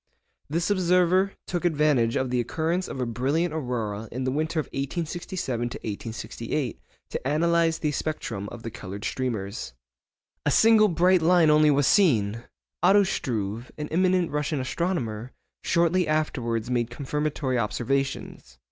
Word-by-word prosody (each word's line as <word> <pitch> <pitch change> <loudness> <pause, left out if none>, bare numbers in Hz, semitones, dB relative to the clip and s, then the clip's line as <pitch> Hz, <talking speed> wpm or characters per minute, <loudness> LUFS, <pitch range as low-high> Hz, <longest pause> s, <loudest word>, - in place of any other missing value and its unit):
This 170 +5 0
observer 185 0 +3
took 175 -1 -3
advantage 150 -8 +2
of 130 -1 0
the 125 - +1
occurrence 165 +9 -1
of - - -6
a 125 - 0
brilliant 140 +9 0
aurora 115 -7 -3
in 130 +2 -3
the 130 - 0
winter 155 +3 -1
of 150 - -1
1867 155 - -3 0.5
68 120 +3 -4 0.3
to - - -3
analyse 165 +3 +2
the 150 -2 -1
spectrum 115 -10 -3
of 120 -1 -9
the 115 - -5
coloured 100 -1 -7
streamers. 110 - -3 0.7
A - - +1
single 220 +6 +6
bright 180 0 +3
line 165 -1 +5
only 150 0 +5
was 145 -1 +3
seen! 115 - +3 0.4
Otto 200 +3 +6
Struve, 115 - -3
an 150 -1 -5
eminent 180 0 +2
Russian 150 0 -1
astronomer, 130 - -2 0.3
shortly 170 +1 +2
afterwards 125 -7 -1
made 120 -1 0
confirmatory 140 -1 -2
observations. 120 - -2
150 Hz, 140 wpm, -26 LUFS, 120-170 Hz, 0.7 s, single